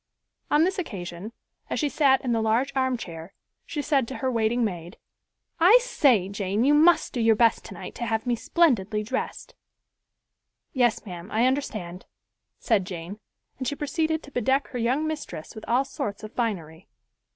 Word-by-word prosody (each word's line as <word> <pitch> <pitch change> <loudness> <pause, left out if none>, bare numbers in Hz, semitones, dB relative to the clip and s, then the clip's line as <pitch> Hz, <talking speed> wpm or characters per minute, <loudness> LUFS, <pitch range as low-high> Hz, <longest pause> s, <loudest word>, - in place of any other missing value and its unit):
On 300 +2 +4
this 375 +2 0
occasion, 185 - -6 0.4
as - - -1
she 300 - +1
sat 275 -2 +3
in 245 - 0
the 225 -1 +1
large 235 +6 +1
armchair, 200 -10 -3 0.3
she 295 -3 -3
said 275 -5 +1
to 265 - -6
her 260 -1 -1
waiting 235 +1 +1
maid, 175 -1 -5 0.6
"I 370 +8 +8
say, 260 - +2
Jane, 200 +2 -1
you 285 +3 +4
must 325 +3 +4
do 245 - -1
your 225 -1 +5
best 230 +1 +3
tonight - - -9
to 235 - -1
have 220 +1 -1
me 245 -1 +1
splendidly 220 - +1
dressed." 260 +5 -4 1.2
"Yes, 245 -4 +1
ma'am, 180 -1 -8
I 225 +3 +2
understand," 215 -10 -2 0.5
said 220 -6 +1
Jane, 180 +2 -7 0.4
and 260 - -3
she 285 - -1
proceeded 315 +2 -1
to 285 - -13
bedeck 265 +3 +1
her 250 - -5
young 255 +7 +1
mistress 305 - -5
with 220 - -9
all 250 +4 +2
sorts 205 -5 -5
of 215 - -8
finery. 180 -8 -3
235 Hz, 170 wpm, -25 LUFS, 205-275 Hz, 1.2 s, I